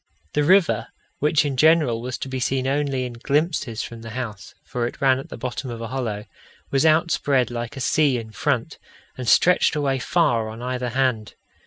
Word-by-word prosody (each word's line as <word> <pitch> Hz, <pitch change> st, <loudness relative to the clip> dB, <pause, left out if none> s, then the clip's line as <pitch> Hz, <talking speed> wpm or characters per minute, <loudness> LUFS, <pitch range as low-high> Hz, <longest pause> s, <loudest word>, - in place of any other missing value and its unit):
The 150 Hz, -, +2 dB
river, 185 Hz, +2 st, +3 dB, 0.3 s
which 150 Hz, +1 st, +2 dB
in 140 Hz, -2 st, -1 dB
general 150 Hz, -5 st, +4 dB
was 125 Hz, +1 st, -4 dB
to -, -, -5 dB
be 130 Hz, 0 st, -4 dB
seen 130 Hz, +1 st, 0 dB
only 135 Hz, -1 st, 0 dB
in 125 Hz, -, -6 dB
glimpses 140 Hz, -1 st, -1 dB
from 115 Hz, -1 st, -8 dB
the 115 Hz, -, -8 dB
house 110 Hz, -6 st, -6 dB
for 120 Hz, -1 st, -2 dB
it -, -, -9 dB
ran 135 Hz, -1 st, +3 dB
at 135 Hz, -, -9 dB
the -, -, -8 dB
bottom 125 Hz, +2 st, -4 dB
of 120 Hz, -1 st, -6 dB
a 115 Hz, -1 st, -5 dB
hollow 115 Hz, -5 st, -3 dB, 0.5 s
was 135 Hz, +3 st, +3 dB
outspread 155 Hz, -5 st, +2 dB
like 120 Hz, +3 st, -5 dB
a -, -, -4 dB
sea 140 Hz, 0 st, +2 dB
in 110 Hz, -2 st, -7 dB
front, 145 Hz, +1 st, -2 dB, 0.4 s
and 125 Hz, -3 st, -3 dB
stretched 180 Hz, -3 st, +4 dB
away 140 Hz, -3 st, 0 dB
far 115 Hz, -2 st, +1 dB
on 110 Hz, +1 st, -8 dB
either 125 Hz, 0 st, -2 dB
hand. 125 Hz, -4 st, -1 dB
130 Hz, 195 wpm, -23 LUFS, 120-145 Hz, 0.5 s, general